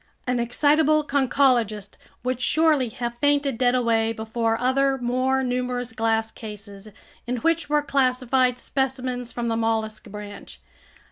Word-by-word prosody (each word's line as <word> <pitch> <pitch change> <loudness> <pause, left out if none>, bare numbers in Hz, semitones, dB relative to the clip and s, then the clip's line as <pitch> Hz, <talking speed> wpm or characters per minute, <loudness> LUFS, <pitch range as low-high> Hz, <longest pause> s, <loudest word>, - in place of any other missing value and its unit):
An 250 -1 0
excitable 300 +5 +3
conchologist 250 -7 +1 0.3
would 255 0 -2
surely 305 -3 +2
have 235 +1 -5
fainted 285 -4 +1
dead 250 -1 +3
away 225 -2 +1
before 225 0 -1
other, 270 +2 +2
more 255 +2 0
numerous 250 -1 -2
glass 225 0 0
cases 205 -2 -10 0.4
in 250 +1 -1
which 330 +4 0
were 295 0 +2
classified 255 -2 +1
specimens 255 -2 -3
from 240 -1 -3
the 225 - 0
mollusk 225 -1 -1
branch. 205 0 -10
250 Hz, 130 wpm, -24 LUFS, 225-265 Hz, 0.4 s, excitable